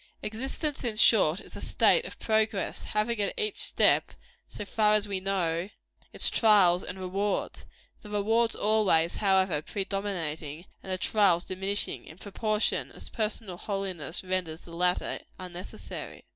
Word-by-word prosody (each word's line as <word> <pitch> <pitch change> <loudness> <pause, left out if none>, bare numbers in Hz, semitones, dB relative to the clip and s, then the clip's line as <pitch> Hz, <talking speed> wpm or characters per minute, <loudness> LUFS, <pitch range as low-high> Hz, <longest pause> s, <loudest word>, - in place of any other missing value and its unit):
Existence, 270 +7 -3
in 235 -3 -1
short, 200 -6 +5
is - - -13
a - - -7
state - - +3
of - - -9
progress, 220 -2 0
having, 215 +1 -1
at 200 - -1
every 430 -1 0
step, - - +3 0.3
so 210 - -7
far 210 0 +3
as 210 0 +2
we 195 -2 -2
know, 185 -2 -1 0.4
its - - +2
trials 195 -6 +5
and 180 - -5
rewards 195 +2 -3 0.3
the 210 - -12
rewards 225 +3 +1
always, 200 -6 +2
however, 190 -6 +2
predominating, 175 -5 -4 0.2
and 190 - -7
the 185 - 0
trials 185 -3 +2
diminishing, 195 +2 -2
in 160 - -13
proportion 215 +2 -1
as - - -8
personal 215 -4 -3
holiness 190 -6 -4
renders 185 -3 -2
the 170 - -12
latter 180 +1 +1 0.2
unnecessary. 180 0 -8
195 Hz, 145 wpm, -28 LUFS, 180-215 Hz, 0.4 s, short